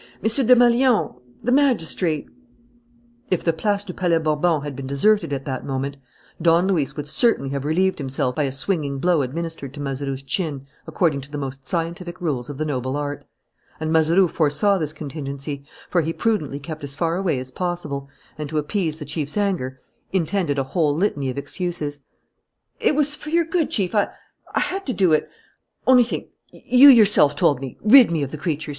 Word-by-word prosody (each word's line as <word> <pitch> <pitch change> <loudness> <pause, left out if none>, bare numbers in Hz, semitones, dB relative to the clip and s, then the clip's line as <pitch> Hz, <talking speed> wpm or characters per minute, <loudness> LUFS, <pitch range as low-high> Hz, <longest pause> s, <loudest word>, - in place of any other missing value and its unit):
M. 225 +3 -1
Desmalions, 245 -1 +4 0.3
the 245 - 0
magistrate 180 - +1 0.5
" 240 +1 -35
If - - -13
the 165 - +2
Place 205 +4 -1
du 190 -3 -7
Palais 175 -2 +1
Bourbon 155 0 +1
had 145 -2 -5
been 135 0 -6
deserted 205 +7 +2
at 135 -1 -3
that 130 -2 -4
moment, 135 +1 -3 0.4
Don 170 +2 +4
Luis 160 -9 0
would 145 -1 -5
certainly 185 - +2
have 140 0 -3
relieved 185 +5 +1
himself 130 -2 -1
by 150 +2 0
a 135 - -2
swinging 140 0 -2
blow 175 +1 +2
administered 140 0 -5
to - - -9
Mazeroux's 135 -1 -4
chin 140 -2 -3 0.2
according 155 -6 0
to 140 - -11
the 145 - -4
most 135 -1 -6
scientific 175 +1 -3
rules 145 -8 -2
of 145 - -6
the 155 - -2
noble 130 -2 -2
art. 145 0 -4 0.5
And 155 0 -2
Mazeroux 165 +4 +4
foresaw 165 +6 +1
this 155 -2 -2
contingency, 140 -1 -6 0.2
for 175 - +1
he 165 +1 -2
prudently 165 -12 -1
kept 155 +1 -8
as 140 -1 -5
far 165 +2 0
away 180 -6 0
as 130 0 -6
possible 150 -4 -4 0.3
and, 150 -1 -4
to 155 - -3
appease 160 +1 -1
the 150 - -7
chief's 150 +3 -4
anger, 150 -11 -1 0.3
intended 175 -4 0
a 135 - +1
whole 145 +2 0
litany 150 -7 0
of 130 - -5
excuses: 150 -2 -4 0.8
"It - - +2
was 295 0 +2
for 300 - -9
your 335 +1 +2
good, 330 -1 0
Chief.... 195 -3 -1
I 205 -2 +3 0.5
had 390 +2 -1
to 255 - 0
do 185 -7 +3
it... 155 - +1 0.6
Only 255 -1 +6
think! 235 - -5 0.2
You 260 +3 +6
yourself 210 - +6
told 145 -2 +2
me: 135 -3 -7
'Rid 240 +4 +8
me 160 -3 0
of 135 - -4
the 155 - -5
creature!' 155 -1 -3
160 Hz, 190 wpm, -22 LUFS, 140-195 Hz, 0.8 s, Rid